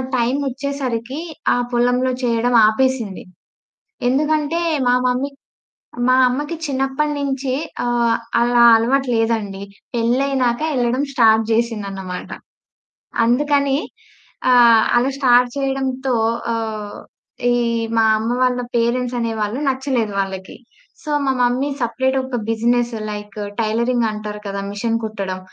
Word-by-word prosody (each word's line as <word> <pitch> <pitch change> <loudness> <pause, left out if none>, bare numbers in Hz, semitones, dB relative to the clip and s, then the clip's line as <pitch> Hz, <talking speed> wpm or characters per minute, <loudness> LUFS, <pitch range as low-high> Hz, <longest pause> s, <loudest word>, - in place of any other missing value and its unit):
టైమోచ్చేసరికి 265 0 -2 0.3
ఆ - - +2 0.2
పొలంలో 245 +2 +2
చేయడం 240 0 +1
ఆపేసింది. 230 -3 0 0.9
ఎందుకంటే 300 +4 +1 0.3
మా 245 - +4
మమ్మీ 250 +3 0 0.8
మా 255 - +5
అమ్మకి 290 +6 -3
చిన్నప్పటి 270 +1 -1
నుంచి 270 -1 -2 0.3
ఆహ్, 235 -1 +2 0.2
అలా 240 0 +4
అలవాటు 260 +4 +1
లేదండి. 220 -4 -1 0.3
పెళ్లైనక 245 +1 +1
యళ్లడం 250 +1 0
స్టార్ట్ 225 -3 +4
చేసిందన్నమాట. 200 -5 -2 1.0
అందుకని 280 +2 +2 0.7
ఆహ్, 235 -3 +6
అలా 255 +3 +2
స్టార్ట్ 245 -2 +4
చేయడంతో 265 -1 -1 0.4
ఆహ్, 215 -2 -4 0.5
ఈ - - +3 0.4
మా 225 - +4
అమ్మ 225 +2 -2
వాళ్ళ 250 -1 +1 0.2
పేరెంట్స్ 245 +1 0
అనే 230 -1 -1
వాళ్ళు 210 +5 -2
నచ్చలేదు 260 -5 -1
వాళ్ళకి. 190 -1 -4 0.5
సో, 305 - -7 0.2
మా 270 - +2
మమ్మీ 245 +3 +1
సెపరేట్ 260 +3 0
ఒక 260 -1 -4
బిజినెస్ 240 +1 +1 0.2
లైకు 210 0 -7 0.2
టైలరింగ్ 235 +2 +1
అంటారు 210 0 -6
కదా! 200 0 -4
మెషిన్ 225 +3 -2
కుట్టడం. 195 -4 -4
245 Hz, 110 wpm, -19 LUFS, 225-265 Hz, 1.0 s, ఆహ్